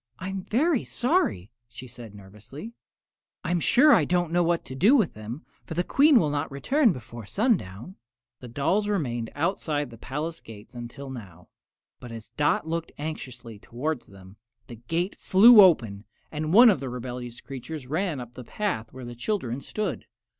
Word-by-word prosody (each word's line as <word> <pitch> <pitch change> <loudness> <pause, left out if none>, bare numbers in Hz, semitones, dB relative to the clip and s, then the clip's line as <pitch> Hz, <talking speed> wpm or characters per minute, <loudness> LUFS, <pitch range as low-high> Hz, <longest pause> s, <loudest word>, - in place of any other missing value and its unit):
"I'm 190 +2 -5
very 280 +4 +1
sorry," 240 - 0 0.2
she 120 +2 -10
said, 120 -4 -11
nervously. 105 - -11 0.7
"I'm 175 0 0
sure 285 - +5
I 185 - +5
don't 175 +1 0
know 175 +1 +2
what 170 0 0
to - - -8
do 200 - +4
with 220 - +2
them, 110 +7 -8 0.2
for 160 - -7
the 175 - +1
Queen 285 - +5
will 150 -7 0
not 145 0 -2
return 250 - +2
before 115 - -9
sundown." 185 - -1 0.4
The 125 - -10
dolls 155 - 0
had 210 - 0
remained 120 - -2
outside 150 -4 -1
the 115 - -13
palace 155 +7 -5
gates 110 +2 -13
until 120 +3 -8
now; 95 -9 -11 0.5
but 120 - -10
as 115 -1 -9
Dot 150 +2 0
looked 165 0 -3
anxiously 125 -7 -7
toward 130 +6 -4
them, 95 0 -16 0.3
the 120 - -11
gate 175 +6 -1
flew 215 +4 +8
open 115 - +3 0.3
and 155 0 -3
one 235 +4 +8
of 185 - -1
the 135 -1 -5
rebellious 125 -1 -6
creatures 135 +2 -8
ran 160 +2 -2
up 120 -1 -9
the 125 - -9
path 185 - -3
to - - -29
where 130 -1 -8
the 120 - -7
children 130 - -3
stood. 210 +6 -4
145 Hz, 175 wpm, -26 LUFS, 120-185 Hz, 0.7 s, flew